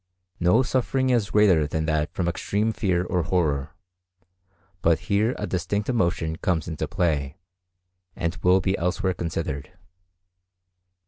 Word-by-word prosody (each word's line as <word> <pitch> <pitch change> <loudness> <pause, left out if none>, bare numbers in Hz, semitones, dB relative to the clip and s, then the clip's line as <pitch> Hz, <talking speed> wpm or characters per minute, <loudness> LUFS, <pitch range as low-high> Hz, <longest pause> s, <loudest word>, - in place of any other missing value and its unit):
No 90 +9 +4
suffering 130 +1 0
is 115 -5 +1
greater 95 -8 +4
than 80 +2 -2
that 80 0 0
from 90 - -2
extreme 100 +5 0
fear 90 -5 0
or 90 -1 0
horror, 80 -4 0 1.1
but 85 -1 +3
here 110 +2 +1
a - - -3
distinct 100 +5 -2
emotion 85 -8 0
comes 85 -3 -1
into 80 -4 -3
play, 75 -3 -1 0.8
and 85 +1 -2
will 90 +2 +3
be 95 +2 0
elsewhere 90 +2 0
considered. 80 -2 -4
90 Hz, 130 wpm, -25 LUFS, 80-100 Hz, 1.1 s, No